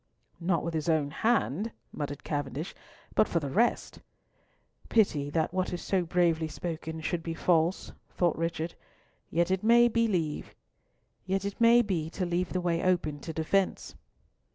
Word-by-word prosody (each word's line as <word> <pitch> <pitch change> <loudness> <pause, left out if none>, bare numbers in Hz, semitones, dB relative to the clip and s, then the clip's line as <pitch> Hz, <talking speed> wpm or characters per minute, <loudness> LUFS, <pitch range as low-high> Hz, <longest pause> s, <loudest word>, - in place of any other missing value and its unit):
"Not 170 0 0
with 170 - -3
his 160 0 -1
own 150 -3 +2
hand," 220 - +1 0.2
muttered 145 -1 -5
Cavendish, 145 +2 -3 0.4
"but - - +4
for 170 - 0
the 140 -4 -4
rest—" 235 - +1 0.9
"Pity 155 -10 +2
that 160 +2 0
what 185 0 0
is 175 - -4
so 190 -2 +1
bravely 165 -2 +2
spoken 160 0 -5
should 170 +1 -2
be 165 0 -4
false," 170 +1 +1 0.2
thought 175 -2 +1
Richard, 165 0 -2 0.6
"yet 170 +2 +1
it 190 +1 0
may 235 +2 +6
be 230 0 +2 1.2
to 200 -3 +2
leave 175 0 -1
the 185 - -1
way 170 -1 +1
open 175 -5 +1
to 160 - -6
defence." 165 +5 0
170 Hz, 140 wpm, -29 LUFS, 160-190 Hz, 1.2 s, may